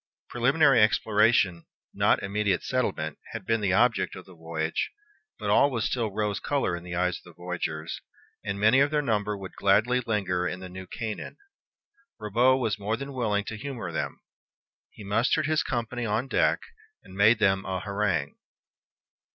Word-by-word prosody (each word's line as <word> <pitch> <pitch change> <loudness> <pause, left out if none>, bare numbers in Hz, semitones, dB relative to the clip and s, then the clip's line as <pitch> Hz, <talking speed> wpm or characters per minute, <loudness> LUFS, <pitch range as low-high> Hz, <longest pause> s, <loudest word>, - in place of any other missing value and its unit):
Preliminary 135 +1 +4
exploration, 105 -4 +3 0.3
not - - +2
immediate 100 -1 0
settlement, 95 - -2
had 115 -4 -6
been 115 +1 +1
the 95 -2 +1
object 110 -3 +2
of 95 - -10
the 95 - -15
voyage; 80 -1 -3 0.5
but - - -2
all 140 - +5
was 115 -5 -2
still 115 -3 0
rose 105 0 -2
color 140 -11 0
in 85 - -8
the 90 0 -6
eyes 90 0 0
of - - -25
the 85 - -15
voyagers, 85 -3 -4 0.4
and 100 0 -3
many 110 +6 +5
of 140 +1 +4
their 150 -1 0
number 105 -4 0
would 95 -1 -8
gladly 110 +6 +3
linger 90 -5 0
in 90 - -4
the 95 0 -8
New 95 +1 -9
Canaan. 110 +2 -5 0.8
Ribaut 120 +5 +3
was 110 -4 -1
more 105 +3 -1
than 140 +1 -7
willing 105 -5 0
to 110 - -6
humor 120 -8 -5
them. 80 - -3 0.7
He 105 - -13
mustered 115 +9 +1
his 155 +1 +2
company 120 -1 -3
on 110 +5 -1
deck, - - +2 0.4
and - - -14
made 105 +4 +5
them 95 -2 +2
a 95 -1 -3
harangue. 100 -8 -1
105 Hz, 170 wpm, -27 LUFS, 95-120 Hz, 0.8 s, all